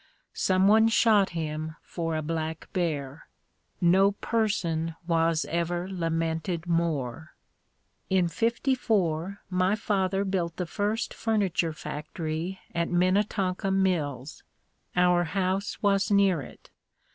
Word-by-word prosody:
Someone 200 +4 +4
shot 220 -3 +4
him 155 -1 -4
for 165 -2 -3
a 155 - -2
black 160 0 -3
bear. 150 -6 -2 0.5
No 190 +3 +4
person 175 -8 -1
was 165 -1 +2
ever 175 +1 -2
lamented 165 -1 -2
more. 160 -4 -2 0.7
In 185 -2 +3
'54 200 - 0
my 185 +2 +2
father 195 -2 0
built 175 -4 -1
the 180 - -2
first 205 +6 -2
furniture 200 -7 0
factory 155 +4 -5
at 170 0 0
Minnetonka 185 +1 +1
Mills. 160 -8 -1 0.5
Our 180 -1 +4
house 195 +4 -2
was 200 0 +2
near 200 -5 +3
it. - - -13
180 Hz, 105 wpm, -27 LUFS, 165-195 Hz, 0.7 s, Someone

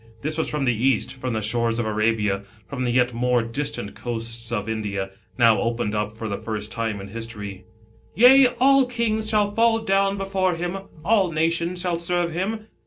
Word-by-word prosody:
This 155 +1 -2
was 160 - -1
from 150 -2 -1
the 125 - +3
East, 125 +2 +1
from 130 -2 -4
the 110 -1 -2
shores 115 +1 0
of 120 - -1
Arabia, 105 -2 0 0.3
from 130 -2 -3
the 120 - +1
yet 125 0 +2
more 125 0 +1
distant 115 -3 -3
coasts 115 0 -3
of 105 -2 -2
India, 100 -3 -3 0.3
now 115 -3 +5
opened 115 -2 -1
up 105 +1 -2
for 110 - -4
th^ 100 -1 -4
first 110 -1 -4
time 115 -3 -2
in 100 0 -8
history, 105 -4 -7 0.2
" 110 - -32
Yea, 255 +3 +8
all 270 0 +5
kings 220 -3 0
shall 210 -2 +2
fall 225 +1 +3
down 195 -2 +1
before 190 -2 0
him; 175 +3 -3 0.3
all 200 -2 +3
nations 170 +2 0
shall 175 -2 -1
serve 175 0 0
him." 215 +5 -3
125 Hz, 190 wpm, -23 LUFS, 110-190 Hz, 0.3 s, Yea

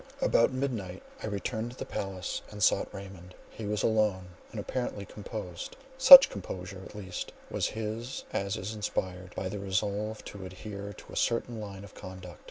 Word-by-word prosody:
About 115 - +4
midnight 115 -9 -3 0.2
I - - -3
returned 110 +3 -3
to - - -16
the - - -4
palace 95 -2 -4
and 105 -1 -4
sought - - +3
Raymond; 95 -2 -10 0.2
he 110 - -7
was 105 0 -1
alone, 105 -5 +2 0.2
and - - -6
apparently 120 -6 -3
composed; 100 -4 -7 0.2
such 265 +1 +12
composure, 95 -1 -6
at 105 - -11
least, 95 -4 -5 0.2
was - - +1
his 110 +3 -4
as 100 0 -1
is 95 +4 -4
inspired 95 -4 -3
by - - -3
a 100 +2 -3
resolve 100 +2 -1
to 100 -2 -8
adhere 100 +2 -7
to 100 - -13
a - - -7
certain 115 0 0
line 100 -2 -7
of 100 - -12
conduct. 95 -2 -9
100 Hz, 175 wpm, -30 LUFS, 95-110 Hz, 0.2 s, such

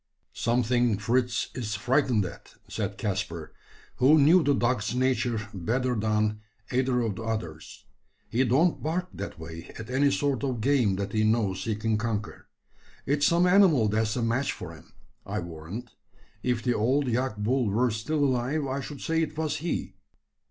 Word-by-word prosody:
"Something 120 -1 +1
Fritz 120 +2 0
is 110 -4 -3
frightened 120 -1 +2
at," 90 - -10
said - - -4
Caspar, - - -3 0.4
who 140 +5 +6
knew 160 +5 +6
the 145 -2 +2
dog's 120 -3 0
nature 120 -4 0
better 125 +7 -1
than 105 -1 0 0.3
either 125 -1 +1
of 110 -5 -2
the - - -5
others. 105 -9 -5 0.4
"He 120 +4 +1
don't 140 +8 +2
bark 180 +4 -2
that - - -6
way 80 0 -9
at 110 +2 -8
any 140 +2 +3
sort 140 -2 0
of 130 -4 -1
game 120 -5 +2
that 100 +1 -4
he 110 -1 +2
knows 110 -4 +1
he 110 -2 0
can 110 0 0
conquer. 110 -2 -4 0.6
It's 145 +1 +2
some 170 +1 +3
animal 180 - +5
that's 110 +1 0
a 120 - -1
match 120 +4 0
for 85 - -8
him, 80 - -16 0.3
I - - -4
warrant. 85 +8 -7 0.5
If 125 -2 -1
the 125 - +2
old 130 +6 +1
yak 125 -1 -1
bull 120 +2 +1
were 120 +4 +2
still 145 +8 0
alive, 135 +3 0
I 135 +1 -2
should 145 0 -8
say 165 0 0
it 155 -1 -3
was 155 -1 -1
he." 165 +3 -3
120 Hz, 170 wpm, -27 LUFS, 110-135 Hz, 0.6 s, who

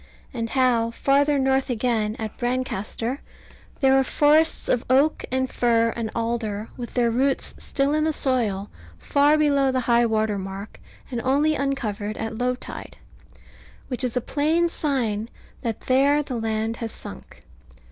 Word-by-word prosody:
And 230 -2 -3
how, 245 -3 +2
farther 280 +4 +2
north 265 0 +1
again, 225 -3 0
at 220 -1 -5
Brancaster, 245 0 -2 0.6
there 265 -1 +5
are - - +3
forests 305 +4 +3
of 245 - +1
oak, 275 +4 +3
and 260 0 +1
fir, 230 -2 +2
and 230 -2 -3
alder, 225 -2 -2
with 240 -2 -8
their 240 -2 +2
roots 265 +3 0
still 275 +1 0
in 305 0 +2
the 315 - +2
soil, 225 -9 -1 0.3
far 290 - +3
below 280 -3 +3
high 240 -2 +3
water 215 -2 0
mark, 195 +2 -7 0.3
and 240 -2 -2
only 285 +5 +2
uncovered 220 -7 -2
at 225 0 -4
low 250 0 +1
tide; - - -9 0.9
which 255 0 -2
is 250 -1 -1
a - - +1
plain 315 +7 +1
sign 235 -9 -1 0.3
that 230 -3 -3
there 280 +3 +3
the 275 - -6
land 225 0 -2
has 230 -1 -4
sunk. - - -10
250 Hz, 150 wpm, -24 LUFS, 225-275 Hz, 0.9 s, there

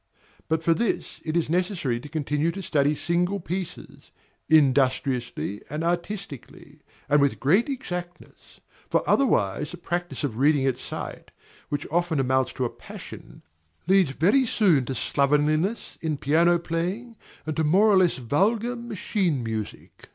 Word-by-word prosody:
But 160 0 0
for 165 - +4
this 230 +5 -2
it 160 +1 -1
is 170 - +1
necessary 170 - -1
to 145 +4 -10
continue 150 0 -1
to 195 - -6
study 150 -4 +1
single 175 +6 0
pieces, 180 0 -6 0.4
industriously 130 -7 +2
and 150 +2 -3
artistically, 175 - -5 0.3
and 145 0 +4
with 140 -1 +1
great 190 - +3
exactness; 180 -10 -7 0.3
for - - +1
otherwise 150 - +2
the 175 - -8
practice 175 0 -4
of 125 -6 -2
reading 140 +1 +3
at 130 -2 0
sight, - - -7 0.4
which 145 -1 -2
often 170 -2 +1
amounts 130 0 +1
to 130 - -2
a - - -1
passion, - - -11 0.4
leads 190 -3 +4
very 200 - +3
soon 175 - +3
to 135 - -4
slovenliness 150 - 0
in 155 -2 -1
piano 165 +5 +3
playing 180 +8 -3 0.3
and 155 -1 -3
to 160 - +1
more 185 +8 +4
or 195 - +5
less 180 -2 +3
vulgar 210 - 0
machine 205 - -2
music. 110 -2 -6
165 Hz, 145 wpm, -25 LUFS, 140-185 Hz, 0.4 s, or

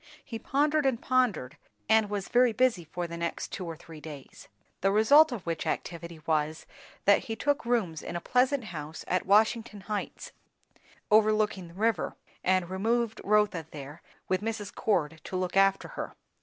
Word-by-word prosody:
He 225 -4 -6
pondered 290 +4 +1
and 245 -4 +1
pondered, 250 - 0 0.3
and 220 -1 +4
was 205 -2 -3
very 245 -1 +4
busy 225 -7 +2
for 175 +2 -4
the 170 0 -6
next 170 0 -3
two 180 -2 -5
or 165 - -5
three 160 -2 -12
days. 145 -4 -10 0.3
The 195 - +3
result 285 +9 +6
of 225 -7 -5
which 165 -2 -3
activity 170 -2 -4
was, 155 0 0 0.4
that 200 0 +5
he 225 - -3
took 285 0 0
rooms 195 -11 0
in 175 - -6
a - - -1
pleasant 255 +7 +2
house 160 -5 -7
at 185 +2 0
Washington 215 +1 +3
Heights, 210 +1 -5 0.8
overlooking 215 -3 +3
the 170 - -15
river, 220 -3 0 0.3
and 185 -1 +2
removed 225 +4 -1
Rotha 205 -6 +2
there, 145 +2 -9 0.3
with 185 0 0
Mrs. 215 -2 -4
Cord 160 -7 0
to - - -5
look 185 0 -2
after 195 0 +3
her. - - -6
200 Hz, 170 wpm, -29 LUFS, 170-225 Hz, 0.8 s, result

